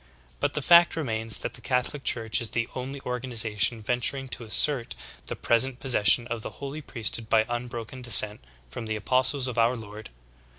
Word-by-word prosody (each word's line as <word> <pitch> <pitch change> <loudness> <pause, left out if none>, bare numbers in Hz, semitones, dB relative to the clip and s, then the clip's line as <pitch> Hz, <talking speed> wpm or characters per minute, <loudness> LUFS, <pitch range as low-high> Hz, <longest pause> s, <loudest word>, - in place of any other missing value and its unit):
But - - -2
the - - -3
fact 170 0 +5
remains 115 -8 -2
that - - -6
the 120 - -11
Catholic 125 +3 -2
Church 115 -1 +1
is 115 - -2
the 115 0 -3
only 130 +2 -7
organization 115 -3 -1
venturing 125 +4 -1
to 120 - -4
assert 120 +3 +2 0.3
the - - -5
pres 115 0 +2
ent 130 -1 -4
possession 120 -2 +4
of 120 -2 -6
the - - -7
holy 140 +2 -7
priesthood 115 -4 -4
by 110 -1 +2
unbroken 120 +1 -7
descent 105 - +6 0.2
from 115 - -8
the 110 - -3
apostles 130 +5 0
of 120 -2 -4
our 120 +2 +1
Lord. 105 -1 -11
120 Hz, 180 wpm, -25 LUFS, 110-130 Hz, 0.3 s, descent